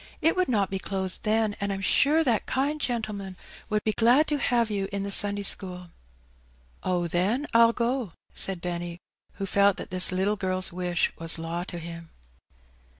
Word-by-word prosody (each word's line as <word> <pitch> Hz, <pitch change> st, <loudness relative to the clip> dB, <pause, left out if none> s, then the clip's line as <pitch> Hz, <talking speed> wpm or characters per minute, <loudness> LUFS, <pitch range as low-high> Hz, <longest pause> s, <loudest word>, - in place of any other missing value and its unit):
It 325 Hz, +2 st, +2 dB
would 370 Hz, 0 st, +1 dB
not 205 Hz, -6 st, 0 dB
be 195 Hz, -, -2 dB
closed 190 Hz, -1 st, -4 dB
then, 215 Hz, -1 st, +1 dB
and 200 Hz, 0 st, -1 dB
I'm 195 Hz, 0 st, -4 dB
sure 300 Hz, +10 st, +3 dB
that 240 Hz, -7 st, 0 dB
kind 285 Hz, +3 st, -1 dB
gentleman 210 Hz, -7 st, -3 dB, 0.3 s
would 210 Hz, -1 st, 0 dB
be 215 Hz, -, +1 dB
glad 240 Hz, +7 st, +4 dB
to 295 Hz, -1 st, 0 dB
have 235 Hz, -4 st, +1 dB
you 195 Hz, -2 st, -2 dB
in 200 Hz, 0 st, -2 dB
the 200 Hz, -, -3 dB
Sunday 205 Hz, 0 st, +3 dB
school." 180 Hz, -3 st, -2 dB, 0.9 s
'^Oh, 175 Hz, -2 st, -1 dB
then, 195 Hz, -, 0 dB
I'll 230 Hz, 0 st, +6 dB
go," 235 Hz, -3 st, -2 dB, 0.2 s
said 190 Hz, -3 st, +2 dB
Benny, 175 Hz, -1 st, -4 dB, 0.4 s
who 195 Hz, -, -5 dB
felt 200 Hz, +1 st, +3 dB
that -, -, -6 dB
this 185 Hz, 0 st, +4 dB
little 195 Hz, +3 st, 0 dB
girl's 185 Hz, -1 st, +1 dB
wish 180 Hz, -1 st, -1 dB
was 165 Hz, 0 st, +1 dB
law 165 Hz, +2 st, -4 dB
to 175 Hz, -, -7 dB
him. 165 Hz, 0 st, -8 dB
200 Hz, 180 wpm, -26 LUFS, 180-230 Hz, 0.9 s, I'll